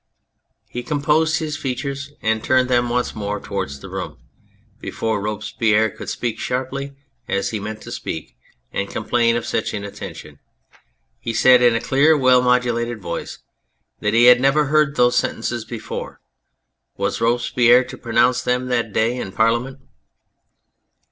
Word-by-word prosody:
He 125 - -5
composed 150 +3 +1
his 155 -2 -3
features 140 +2 -4
and 110 0 0
turned 130 0 +2
them 120 -1 +2
once 125 +1 -1
more 105 -1 -3
towards 95 -11 -5
the - - -9
room. - - -6 0.6
Before 110 -2 -2
Robespierre 105 +1 0
could - - -8
speak 115 -2 -3
sharply, 135 +2 -3 0.3
as 100 - -1
he 110 - -3
meant 110 +1 -6
to - - -9
speak, 80 -6 -6 0.4
and 100 - -2
complain 115 -1 +1
of 120 - -2
such - - -2
inattention, 100 -1 -8 0.8
he 115 - -4
said 125 +2 +6
in 120 -2 +5
a - - +1
clear, 150 +6 +3
well 130 -2 +5
modulated 120 -2 +1
voice, 85 -3 -6 0.6
that 105 +1 0
he 115 - +5
had 125 0 +7
never 140 +3 +3
heard 150 0 +2
those 125 -2 +3
sentences 115 0 -2
before. 115 -1 -7 0.8
Was 100 +2 -2
Robespierre 120 +1 +4
to - - -9
pronounce 120 +1 +2
them 125 +1 -1
that 120 -4 -1
day 115 +2 +1
in 95 - -5
Parliament 120 +5 0
120 Hz, 150 wpm, -20 LUFS, 110-130 Hz, 0.8 s, had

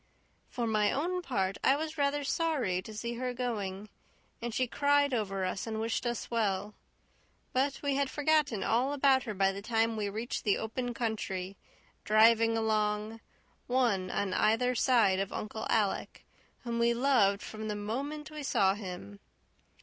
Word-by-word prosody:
For 240 - -2
my 215 -2 +2
own 360 +6 -1
part, 195 - -1
I 270 - +5
was 315 +2 -4
rather 285 -1 0
sorry 275 - 0
to 220 - -10
see 235 +2 -4
her 250 -1 -2
going; 210 -5 -3 0.5
and 240 0 -3
she 255 +3 +1
cried 285 +2 +2
over 195 -5 -1
us 190 +4 -3
and 220 -1 -3
wished 225 +2 -1
us 240 0 -4
well; 210 -3 0 0.8
but 270 +2 +1
we 285 -1 +1
had 280 -1 +1
forgotten 290 -6 +1
all 250 +5 +1
about 270 -2 +3
her 215 -3 -4
by 195 0 +3
the 195 +1 -7
time 225 +1 +1
we 210 -2 -2
reached 220 +4 -4
the 205 - +2
open 240 +2 -3
country, 200 -5 -3 0.5
driving 225 +1 +5
along, 215 0 0 0.5
one 235 -8 +1
on 190 0 -1
either 235 +6 +2
side 230 -6 +3
of 195 0 -2
Uncle 220 +1 -5
Alec, 210 -3 0 0.4
whom 235 -1 -2
we 235 0 +3
loved 235 -6 +3
from 220 0 -6
the 210 - -2
moment 280 +9 -4
we 305 0 -6
saw 195 -8 +2
him. 180 - -8
225 Hz, 165 wpm, -31 LUFS, 205-260 Hz, 0.8 s, I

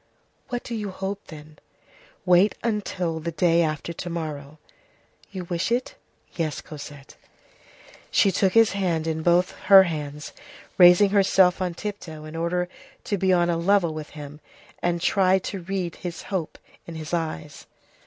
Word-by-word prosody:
"What 245 -1 -3
do 240 - -6
you 210 -3 -3
hope, 195 +1 -5
then?" 155 -1 -12 0.7
"Wait 180 +3 +4
until 190 -7 -2
the 170 +2 -4
day 165 +1 +3
after 155 +1 -2
to 175 - -6
morrow." 155 -3 -6 0.7
"You 190 -2 -6
wish 175 +4 -2
it?" 245 +2 -1 0.4
"Yes, 160 -3 -2
Cosette." 145 -2 -11 0.9
She 195 - +3
took 190 0 +1
his 225 -1 +5
head 175 -5 -1
in 160 -1 -2
both 175 +2 +3 0.2
her 195 -1 +10
hands, 150 -4 -5 0.5
raising 180 +3 +7
herself 190 -2 +4
on 180 -2 -2
tiptoe 170 -7 -7
in 155 +1 -9
order 175 +2 -1 0.4
to 205 - -2
be 190 0 +2
on 175 -1 +3
a 165 - 0
level 175 -1 +2
with 155 -1 -7
him, 145 0 -9 0.4
and 175 0 0
tried 190 0 +3
to 195 - -5
read 180 -1 -4
his 175 -2 -6
hope 175 -5 -3 0.3
in 170 - -8
his 155 0 -7
eyes. 155 -3 -4
175 Hz, 155 wpm, -24 LUFS, 160-190 Hz, 0.9 s, her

